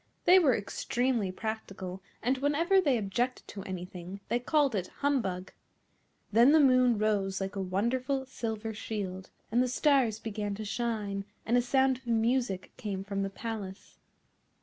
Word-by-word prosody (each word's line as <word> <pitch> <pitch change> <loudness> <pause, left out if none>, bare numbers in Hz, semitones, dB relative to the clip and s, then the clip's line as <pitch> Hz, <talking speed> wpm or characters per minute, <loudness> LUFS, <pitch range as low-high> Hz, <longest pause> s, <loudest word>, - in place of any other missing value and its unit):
They 370 +1 +8
were 280 -9 +4
extremely 235 0 -1
practical, 195 -3 -5 0.2
and 255 +3 +1
whenever 330 +7 +3
they 280 -8 +2
objected 235 +5 -2
to 200 - -7
anything 180 0 -6
they 240 - +2
called 285 +1 +2
it 185 -3 -1
humbug. 210 -11 -1 0.8
Then 235 +7 +6
the 315 - +7
moon 255 -4 +5
rose 200 -3 0
like 195 +1 -4
a 195 - -2
wonderful 250 +8 -1
silver 225 -4 -4
shield; 195 -3 -5 0.2
and 240 +2 +3
the 255 - +2
stars 250 -3 +3
began 210 -2 -4
to 215 +1 -6
shine, 210 -3 -2 0.2
and 235 - +2
a 245 - +5
sound 265 +1 +2
of 260 - -21
music 230 -3 0
came 200 -5 -4
from 200 0 -3
the 195 - -1
palace. 200 -2 -7
225 Hz, 155 wpm, -30 LUFS, 195-255 Hz, 0.8 s, They